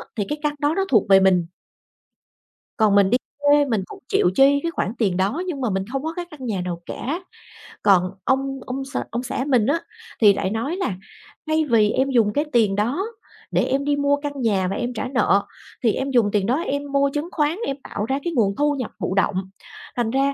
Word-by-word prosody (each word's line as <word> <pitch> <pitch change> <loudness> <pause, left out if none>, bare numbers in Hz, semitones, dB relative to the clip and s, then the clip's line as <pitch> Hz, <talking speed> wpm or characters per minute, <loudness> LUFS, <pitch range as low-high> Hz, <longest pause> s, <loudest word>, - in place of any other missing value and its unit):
thì 210 - 0
cái 295 0 -3
căn 295 -1 0
đó 290 +2 +1
nó 390 0 +1
thuộc 215 -5 +3
về 195 0 +8
mình. 185 -3 +3 1.3
Còn 215 -2 +4
mình 200 -1 +5
đi 245 - +4 0.3
thuê 290 0 +5
mình 225 -7 0
cũng - - -11
chịu - - +3
chi 280 +1 +5
cái 335 - -1
khoản 225 - -2
tiền 195 -6 +1
đó 200 - 0
nhưng 300 -7 -3
mà 245 - 0
mình 190 -1 -1
hông 270 +1 -2
có 320 +1 -3
cái 350 +1 -5
căn 285 -4 -9
nhà 205 -6 -2
nào 175 -1 -4
cả. 320 - -4 0.6
Còn 185 -3 +4
ông 270 +2 0
ông 270 +1 -4
x 275 - -5
ông 240 +2 -2
xã 260 +1 -3
mình 250 -6 +3
á 305 +4 +2 0.4
thì 205 -2 +7
lại 190 - -2
nói 230 - -2
là 375 - -1 0.5
"Thay 315 0 +2
vì 220 -3 +4
em 270 +1 +1
dùng 225 -5 +2
cái 295 +5 +1
tiền 215 -5 +3
đó 245 - 0 0.5
để - - +2
em 275 +1 0
đi 290 0 +2
mua 285 0 +2
căn 285 -1 -5
nhà 200 -6 +1
và 195 - -2
em 245 +2 -3
trả 220 - -3
nợ, 240 -6 +2 0.4
thì 225 -3 +3
em 275 +1 -2
dùng 235 -5 +3
tiền 200 -2 +1
đó 240 +5 +2
em 285 0 -3
mua 280 0 +3
chứng 300 +3 -3
khoán 300 +2 0
em 275 - -2
tạo 210 - -4
ra 270 +4 -1
cái 345 - -2
nguồn 205 -7 +2
thu 295 +3 +2
nhập 255 -5 -4
thụ 190 - -2
động, 190 -1 0 0.5
thành 240 -3 0
ra 275 +2 +1
255 Hz, 235 wpm, -22 LUFS, 205-285 Hz, 1.3 s, về